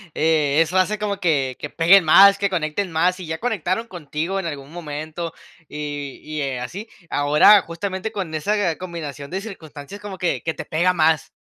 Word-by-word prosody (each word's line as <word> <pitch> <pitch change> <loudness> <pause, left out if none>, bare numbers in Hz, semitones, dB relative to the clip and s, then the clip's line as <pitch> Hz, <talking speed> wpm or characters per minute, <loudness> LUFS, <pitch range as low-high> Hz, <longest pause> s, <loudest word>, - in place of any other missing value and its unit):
e 155 -2 +2
eso 165 +3 +1
hace 210 +3 +1
como 205 -1 -3
que 140 -8 +1
que 150 - -5
peguen 175 +5 +5
más, 195 +5 +7
que 200 -1 +1
conecten 175 +2 -2
más. 175 +3 +2
Si 185 - -8
ya 160 0 -3
conectaron 225 -2 -2
contigo 170 +1 -4
en 190 - -3
algún 140 -2 -7
momento 155 0 -6 0.4
y 145 -2 -6
y, 155 0 -5
eh, 135 -2 -2
así, 200 - -7 0.2
ahora, 150 +8 +6
justamente, 190 +5 -5
con 190 -7 -5
esa 185 +2 0
combinación 150 -6 -7
de 190 - -3
circunstancias 170 -3 -10
como 205 -2 -7
que 180 - -1
que 160 - -3
te - - -6
pega 175 +4 +1
más. 160 -2 +2
165 Hz, 185 wpm, -21 LUFS, 150-195 Hz, 0.4 s, más